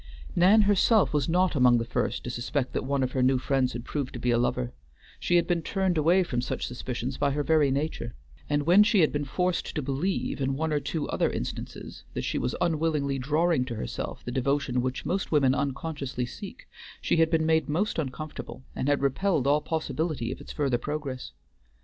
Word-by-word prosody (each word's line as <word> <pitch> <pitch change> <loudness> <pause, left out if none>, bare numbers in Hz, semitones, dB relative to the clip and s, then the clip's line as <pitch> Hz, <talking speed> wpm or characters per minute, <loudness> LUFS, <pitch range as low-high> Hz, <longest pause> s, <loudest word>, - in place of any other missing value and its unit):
Nan 200 +5 +6
herself 205 0 +4
was 145 -1 +1
not 180 +2 +3
among 125 -3 +5
the 115 - -1
first 120 - -2
to 125 - -4
suspect 125 +2 -2
that - - -1
one 140 0 0
of 130 - -1
her 130 - 0
new 130 +1 +4
friends 130 0 0
had 120 0 -6
proved 140 -4 -3
to 120 - -5
be 120 +1 +1
a 120 - +3
lover; 120 0 -1 0.5
she 175 - +1
had 170 - +4
been 175 -2 0
turned 190 +2 0
away 170 +5 +4
from 125 -8 -2
such - - -3
suspicions 125 +1 -4
by 145 - +2
her 145 +1 -1
very 155 -2 +3
nature; 135 -4 -2 0.3
and 145 0 +1
when 180 +5 +7
she 210 -2 +4
had 155 - +4
been 145 0 -2
forced 180 +6 -1
to 150 - 0
believe 140 +4 -2
in 135 0 0
one 160 +2 -1
or 150 - +2
two 150 +1 -3
other - - +1
instances - - -6
that - - -2
she - - -1
was - - -1
unwillingly 155 -5 0
drawing 155 +2 +2
to 120 -2 -5
herself 110 - -5
the 125 - -3
devotion 130 -1 0
which 130 +1 -3
most 190 +2 -1
women 140 -4 +4
unconsciously 140 -2 -2
seek, - - -9 0.3
she - - +1
had 160 0 +4
been 160 -1 +2
made 160 -1 +2
most 175 +5 0
uncomfortable, 145 - -6
and 130 - -2
had 145 -1 +2
repelled 145 +1 +1
all 145 +2 +3
possibility 155 -5 -2
of - - -7
its - - -9
further 135 -5 0
progress. 145 -2 -4
145 Hz, 210 wpm, -27 LUFS, 130-165 Hz, 0.5 s, when